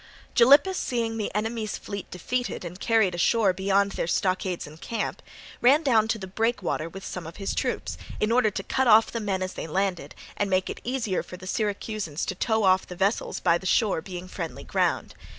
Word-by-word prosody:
Gylippus 285 +10 +6
seeing 230 -2 -1
the 215 - -2
enemy's 220 0 -2
fleet 200 -2 -7
defeated 245 +4 -3
and 175 +2 -7
carried 220 -5 +3
ashore 195 +3 +3
beyond 195 +1 +2
their 165 - -2
stockades 185 0 0
and 155 +2 -13
camp, 230 - -3 0.4
ran 280 +6 +5
down 225 -6 +4
to 225 - 0
the 195 - -6
breakwater 195 -5 -1
with 195 +3 -9
some 180 -3 -6
of 165 - -9
his 195 -1 -3
troops, - - -2 0.2
in 215 - +1
order 240 -2 +4
to 195 -1 -5
cut 265 +5 0
off 225 0 +6
the 230 - -2
men 195 -3 -1
as 185 - -4
they - - -5
landed 180 -3 -2 0.2
and 205 - -1
make 185 0 +1
it - - -9
easier 235 -7 -1
for 180 - -10
the 185 - -11
Syracusans 205 -5 -2
to - - -2
tow 220 +3 0
off 185 -1 +4
the 180 - -8
vessels 195 +4 0
by 170 -1 +3
the 190 - -5
shore 205 -5 +2
being 180 0 -7
friendly 170 -3 -6
ground. - - 0
200 Hz, 205 wpm, -26 LUFS, 185-225 Hz, 0.4 s, Gylippus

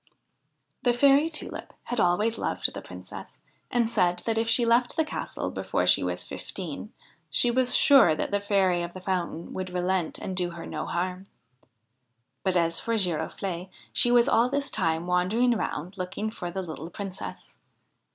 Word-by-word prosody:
The 245 - +3
Fairy 280 +5 +5
Tulip 310 - -5
had 245 - -3
always 210 +5 +2
loved - - -1
the - - -6
Princess, - - -10 0.3
and 240 -2 +2
said 180 -6 +1
that 225 - 0
if 225 0 0
she 235 +1 +5
left 240 +1 +3
the 320 - +2
castle - - -4
before - - -1
she - - +5
was - - -2
fifteen, - - -7 0.4
she 240 - +4
was 250 +1 +3
sure 275 - +7
that - - -3
the 205 - +2
Fairy 195 -3 +2
of 175 +1 -6
the - - -6
Fountain 175 -3 -3
would 185 0 -4
relent 180 -1 -1
and 185 - -5
do 180 -1 0
her 170 -1 -8
no - - -5
harm. 185 +2 -3 1.1
But, 190 -1 0
as 165 -1 +2
for 230 0 -1
Giroflee, 180 0 -2 0.2
she 240 - +4
was 240 +1 +5
all 245 -2 +4
this 280 +1 -2
time 165 -4 0
wandering 195 +8 +2
round 185 -2 -4
looking 195 +4 -3
for 175 -5 -6
the 190 +2 -4
little 160 -1 -7
Princess. 195 0 -8
190 Hz, 170 wpm, -27 LUFS, 175-235 Hz, 1.1 s, sure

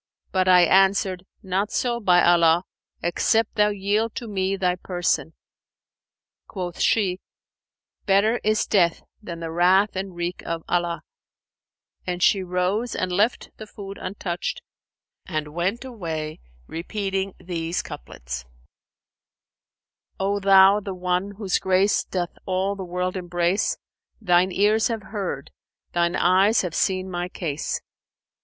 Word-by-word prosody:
But 185 -1 +1
I 180 -1 +7
answered, 190 +1 +3 0.2
'Not 195 +2 -1
so, 240 -1 0
by 180 -5 +4
Allah, 170 0 +5 0.4
except 215 +6 +1
thou 210 -1 +3
yield 210 +3 -1
to 235 - -5
me 195 -2 -1
thy 180 -2 +1
person.' 175 -3 -1 1.1
Quoth 180 -3 -6
she, 190 -4 +2 0.9
'Better 205 +4 +3
is 215 +1 +2
death 170 -4 +2 0.2
than 170 -5 -7
the 165 -1 -4
wrath 185 +5 +3
and 190 -1 -4
wreak 175 +1 -3
of 165 -1 -4
Allah;' 175 -1 -1 1.0
and 180 0 -1
she 195 - +4
rose 185 +6 -1
and 185 0 -1
left 210 +6 +1
the 215 - -9
food 200 -1 -9
untouched 185 -2 -4 0.6
and 155 -4 -3
went 190 +9 -1
away 160 -10 -5 0.3
repeating 195 - -3
these 170 -1 -3
couplets, - - -7 1.7
'O 200 +1 0
Thou, 195 +1 +6
the 195 -2 -6
One, 180 +2 -1
whose 200 -4 0
grace 190 +2 +2
doth 175 -2 -4
all 190 +2 0
the 195 - -6
world 180 +1 -2
embrace; 175 +2 0 0.2
* - - -49
Thine 180 -3 +3
ears 210 +3 +3
have 225 -3 -3
heard, 200 -4 -4 0.4
Thine 170 0 +1
eyes 190 +5 +4
have 180 -3 -4
seen 185 +1 0
my 175 -1 -3
case! 155 -5 -3
185 Hz, 130 wpm, -24 LUFS, 175-200 Hz, 1.7 s, I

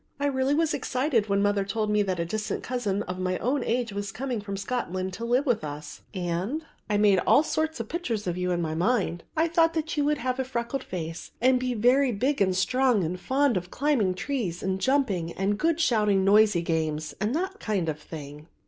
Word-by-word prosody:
I 285 - 0
really 270 0 +1
was 325 0 +2
excited 255 -4 0
when 200 0 +2
mother 205 -1 +2
told 210 +2 -1
me 210 0 +3
that 190 -3 -1
a 170 - 0
distant 215 +3 -3
cousin 210 -5 -1
of 180 0 -5
my 185 0 0
own 260 +2 0
age 235 -2 -1
was 200 0 -4
coming 245 0 -3
from 200 -1 -5
Scotland 190 -4 -3
to 230 +5 -5
live 250 +4 +2
with 240 - +1
us; 150 0 -7
and 185 - -2 0.2
I 210 - +2
made 205 -2 +5
all 285 - +4
sorts 315 -2 -1
of 230 - -4
pictures 235 - -3
of 175 -2 -1
you 180 0 -1
in 175 -1 0
my 155 -1 -2
mind. 180 -1 0
I 320 +1 +3
thought 330 0 +3
that 320 +1 -2
you 290 - +3
would 300 0 +2
have 255 +1 -2
a - - +2
freckled 255 +1 -3
face 165 -2 -6
and 255 +1 +4
be 250 -1 -1
very 250 +4 +4
big 255 +4 0
and 185 -2 +3
strong 250 +2 +2
and 175 +3 -3
fond 265 +2 +2
of 180 0 -4
climbing 245 -10 +1
trees 195 -7 -3
and 190 0 -1
jumping 215 -12 +1
and 200 +2 -1
good 330 0 +1
shouting 210 -10 +3
noisy 205 -3 +5
games 155 -2 -1
and 215 +6 0
that 380 +4 -2
kind 200 - -1
of 155 -1 -2
thing." 150 -1 -9
215 Hz, 220 wpm, -27 LUFS, 185-260 Hz, 0.2 s, made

